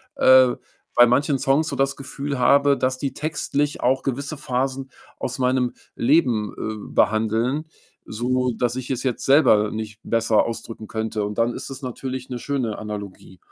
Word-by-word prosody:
äh, 130 -1 +6 0.4
bei 120 0 +8
manchen 135 +3 +2
Songs 140 +4 +2
so - - -3
das 135 0 +1
Gefühl 140 0 -5
habe, 140 +2 +4
dass 130 -1 0
die 135 +1 -3
textlich 145 -1 -2
auch 130 +2 +2
gewisse 140 +3 -3
Phasen 130 0 -2 0.3
aus 130 - -3
meinem 125 -1 +1 0.2
Leben, 120 -6 +2
äh, 110 -1 -6
behandeln, 110 +7 +1 0.4
so 125 +3 -1
dass 120 -1 0
ich 130 -1 -5
es 130 -1 -2
jetzt 125 -3 -2
selber 125 -7 +5
nicht 110 0 -6
besser 115 -1 +2
ausdrücken 115 -1 -6
könnte 110 -1 -3
und 105 0 -4
dann 115 +1 +1
ist - - -6
es 135 +1 -8
natürlich 130 +1 -5
'ne 125 -1 -4
schöne 125 -5 -2
Analogie. 100 -3 -8
125 Hz, 165 wpm, -22 LUFS, 110-135 Hz, 0.4 s, bei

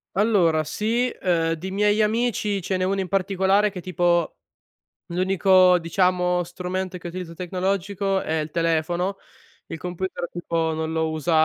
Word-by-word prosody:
Allora 180 -7 +3
sì, 230 +9 0
uhm, 165 -3 +1
di 180 +4 -6
miei 210 +2 +2
amici 215 -2 0
ce 190 +2 -2
n'è 185 - 0
1 195 +1 0
in 190 - -2
particolare 195 +2 +2
che 185 - -7
tipo 175 -2 +1 0.7
l'unico, 185 0 +4
diciamo, 180 +1 +1
strumento 180 +1 -4
che 175 - -8
utilizza 175 -1 -6
tecnologico 190 +2 -1
è 160 -2 -2
il 150 0 -4
telefono. 170 +3 0 0.5
Il - - -6
computer 180 +1 -4
tipo 165 -2 -2
non 160 0 -3
lo 160 0 0
usa 155 +2 -2
180 Hz, 145 wpm, -23 LUFS, 170-195 Hz, 0.7 s, l'unico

